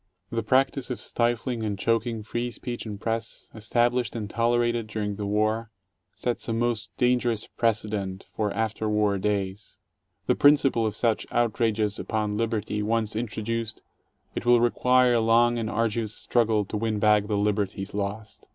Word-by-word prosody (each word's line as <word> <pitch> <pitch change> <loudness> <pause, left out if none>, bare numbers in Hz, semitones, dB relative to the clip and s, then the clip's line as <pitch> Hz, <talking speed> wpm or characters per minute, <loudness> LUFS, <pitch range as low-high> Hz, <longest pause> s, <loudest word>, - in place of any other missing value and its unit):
The 115 -1 0
practice 130 +3 +1
of 125 - -3
stifling 120 0 -1
and 105 -2 -2
choking 115 +1 0
free 120 +3 -3
speech 120 0 -6
and 105 -2 -6
press, 115 +1 -4
established 120 +3 0
and 110 -3 -3
tolerated 120 +1 +1
during 105 -1 -3
the 100 0 -4
war, 110 +2 0 0.5
sets 120 -1 -2
a - - 0
most 115 -2 -1
dangerous 125 -3 +1
precedent 105 -4 -2
for 105 -2 -2
after 110 0 -1
war 105 -2 +2
days. 100 0 -2 0.5
The - - +3
principle 140 -6 +4
of 105 - -3
such 115 -3 0
outrages 110 -3 +1
upon 105 -2 -1
liberty 110 -1 -1
once 110 0 0
introduced, 115 0 -3 0.5
it - - -4
will 120 0 +5
require 125 +1 +4
a 120 - +3
long 120 +1 +4
and 110 -2 -2
arduous 110 -1 -1
struggle 110 -3 +1
to 105 - -4
win 110 0 -1
back 105 -1 +3
the 105 -1 0
liberties 100 -1 -1
lost. 105 +1 -5
110 Hz, 155 wpm, -26 LUFS, 105-120 Hz, 0.5 s, will